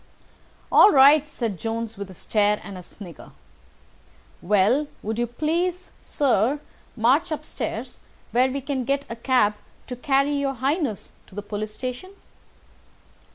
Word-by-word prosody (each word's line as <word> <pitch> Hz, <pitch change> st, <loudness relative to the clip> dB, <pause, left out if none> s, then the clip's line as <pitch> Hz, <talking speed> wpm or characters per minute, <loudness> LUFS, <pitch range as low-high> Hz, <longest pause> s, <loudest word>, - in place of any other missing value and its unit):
'" -, -, -33 dB, 0.3 s
"All -, -, +8 dB
right," 285 Hz, +2 st, +6 dB
said 225 Hz, -, -4 dB
Jones 225 Hz, 0 st, -4 dB
with 200 Hz, -1 st, -7 dB
a 185 Hz, -, -11 dB
stare 210 Hz, +3 st, +1 dB
and 200 Hz, -, -8 dB
a 180 Hz, -, -8 dB
snigger. 180 Hz, -1 st, -13 dB, 1.1 s
"Well, 210 Hz, +10 st, +2 dB, 0.2 s
would 220 Hz, +2 st, -3 dB
you 240 Hz, -, 0 dB
please, 340 Hz, +8 st, -2 dB
sir, 265 Hz, 0 st, +1 dB, 0.4 s
march 245 Hz, +7 st, +2 dB
upstairs, 310 Hz, -, -5 dB, 0.3 s
where 250 Hz, +2 st, +3 dB
we 275 Hz, +1 st, -3 dB
can 270 Hz, -1 st, -2 dB
get 275 Hz, +2 st, -1 dB
a -, -, -4 dB
cab 235 Hz, -3 st, +2 dB, 0.3 s
to 250 Hz, -, -6 dB
carry 275 Hz, +2 st, +1 dB
your 275 Hz, -1 st, -1 dB
Highness 270 Hz, -, -2 dB, 0.2 s
to -, -, -17 dB
the 205 Hz, -, -5 dB
police 210 Hz, +1 st, -5 dB
station?" 255 Hz, +10 st, -6 dB
250 Hz, 145 wpm, -24 LUFS, 215-280 Hz, 1.1 s, All